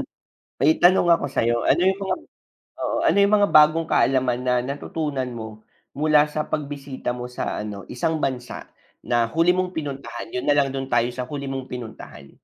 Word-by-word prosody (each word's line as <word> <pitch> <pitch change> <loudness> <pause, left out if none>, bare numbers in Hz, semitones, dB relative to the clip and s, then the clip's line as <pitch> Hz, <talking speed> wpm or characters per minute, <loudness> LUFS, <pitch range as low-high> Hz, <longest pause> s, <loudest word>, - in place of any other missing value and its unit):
Ayon, - - -3 0.6
may 155 +3 +4
tanong 175 -1 +5
ako 165 -4 +3
sa'yo, 120 -3 0
ano - - +3
'yong 190 +1 +2
mga 195 -1 -1 0.7
oo, - - -1
ano - - +3
'yong 200 +1 +5
mga 205 - +3
bagong 155 +2 +5
kaalaman 130 -2 +2
na, 125 -1 +2
natutunan 140 0 -3
mo, 110 -1 -9 0.3
mula 150 0 +4
sa 150 0 -3
pagbisita 140 -3 -4
mo 125 0 -6
sa 125 - -4
ano, 105 -2 -6
isang 160 +5 -1
bansa, 125 -3 -4 0.3
na 120 -1 +1
huli 165 +9 +2
mong 185 0 -2
pinuntahan? 140 -3 -6
'Yon 125 - -4
na 145 - +4
lang, 140 -2 +2
do'n 135 0 -4
tayo 120 0 +2
sa 125 0 -5
huli 140 -1 -5
mong 135 -1 -4
pinuntahan. 110 - -9
135 Hz, 185 wpm, -23 LUFS, 125-155 Hz, 0.7 s, tanong